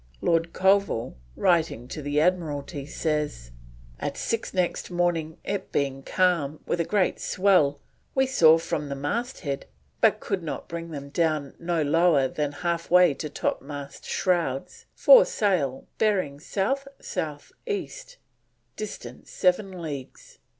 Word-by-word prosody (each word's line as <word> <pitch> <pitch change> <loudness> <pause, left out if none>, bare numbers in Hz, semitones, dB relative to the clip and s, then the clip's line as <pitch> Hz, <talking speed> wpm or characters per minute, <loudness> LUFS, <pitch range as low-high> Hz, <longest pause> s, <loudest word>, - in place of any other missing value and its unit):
Lord 165 - +1
Colville, 190 - +2 0.2
writing 165 -9 +1
to 155 - -5
the 145 +1 0
Admiralty, 150 -4 -1
says: 150 - -2 0.5
"At - - -3
six 230 -1 -2
next 180 -2 -1
morning 175 -3 0
it 195 -1 -3
being 135 -1 -1
calm 165 -3 +1
with 175 - -1
a - - +3
great 200 0 +1
swell, 180 -7 +3 0.4
we 265 0 +4
saw 165 -11 +6
from 150 -3 -3
the 140 - -3
masthead, 145 - -3 0.3
but - - +4
could 195 -2 -2
not 165 - -5
bring 170 -1 -6
them 140 -3 -7
down 155 -3 0
no 170 -2 0
lower 150 -2 +4
than 145 +2 -2
halfway 170 0 +4
to 150 +2 -5
topmast 140 0 -4
shrouds, 170 -8 -1
four - - +8
sail 185 - 0
bearing 185 -10 +1
South 215 - -1
South 150 -2 -5 0.2
East, - - -5 0.6
distance 215 -1 -8
7 185 -1 0
leagues. 140 -5 -8
165 Hz, 130 wpm, -26 LUFS, 145-185 Hz, 0.6 s, four